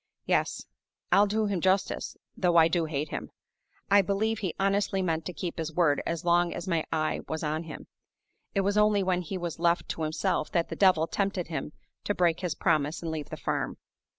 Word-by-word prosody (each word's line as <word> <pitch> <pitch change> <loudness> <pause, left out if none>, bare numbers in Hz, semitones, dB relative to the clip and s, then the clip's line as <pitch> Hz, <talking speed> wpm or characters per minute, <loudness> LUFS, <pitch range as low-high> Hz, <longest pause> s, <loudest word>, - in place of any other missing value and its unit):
Yes. - - 0 0.5
I'll 205 +1 +6
do 215 +2 0
him 200 -4 -1
justice, 190 +2 0 0.2
though 175 -2 +2
I 160 -1 +7
do 170 0 0
hate 150 -1 -3
him! - - -5 0.6
I 200 0 +7
believe 205 +3 0
he 190 -6 -3
honestly 195 0 +1
meant 165 -2 -1
to - - -3
keep 170 +1 -5
his 165 0 -3
word 160 -3 +2
as 170 0 -3
long 175 0 +3
as 175 - -6
my 165 -3 +1
eye 155 -1 0
was 160 0 -3
on 155 +2 -2
him. 155 - -8 0.7
It 195 - +3
was 200 +2 +2
only 210 -1 +4
when 180 -1 +1
he 185 +2 -5
was 170 -3 -5
left 170 0 +2
to - - -4
himself 160 +2 0
that 170 -1 +1
the - - -4
Devil 185 -5 +4
tempted 195 -1 -2
him 155 -2 -4 0.3
to 205 - 0
break 170 -2 +2
his 180 -5 -2
promise 155 0 0
and 165 - -3
leave 155 -2 -5
the - - -6
farm. - - -2
175 Hz, 205 wpm, -28 LUFS, 160-195 Hz, 0.7 s, I